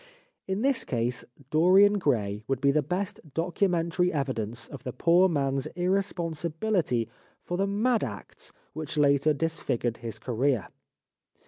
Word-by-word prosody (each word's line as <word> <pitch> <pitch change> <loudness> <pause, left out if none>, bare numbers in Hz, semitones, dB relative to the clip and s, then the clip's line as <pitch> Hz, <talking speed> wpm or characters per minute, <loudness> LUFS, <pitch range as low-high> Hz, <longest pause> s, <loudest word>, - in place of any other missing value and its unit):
In 190 +4 -1
this 270 -3 +2
case 120 0 -2
'' 140 -1 -22
Dorian 190 +6 +5
Gray" 105 - 0
would 135 -2 0
be 140 +1 +3
the 150 +2 +2
best 185 +7 -3 0.2
documentary 175 0 +1
evidence 125 -5 -2
of 140 - -10
the 125 - -4
poor 170 +8 +4
man's 135 -4 0
irre 185 +3 +2
sponsibility 165 - -1 0.4
for 175 - -3
the 195 +2 +1
mad 220 +4 +1
acts 105 -6 -7 0.2
which 155 0 -5
later 140 +1 +4
dis 165 +2 -1
figured 120 -1 -1
his 115 -2 -6
career. 125 +1 0
155 Hz, 145 wpm, -27 LUFS, 130-180 Hz, 0.4 s, Dorian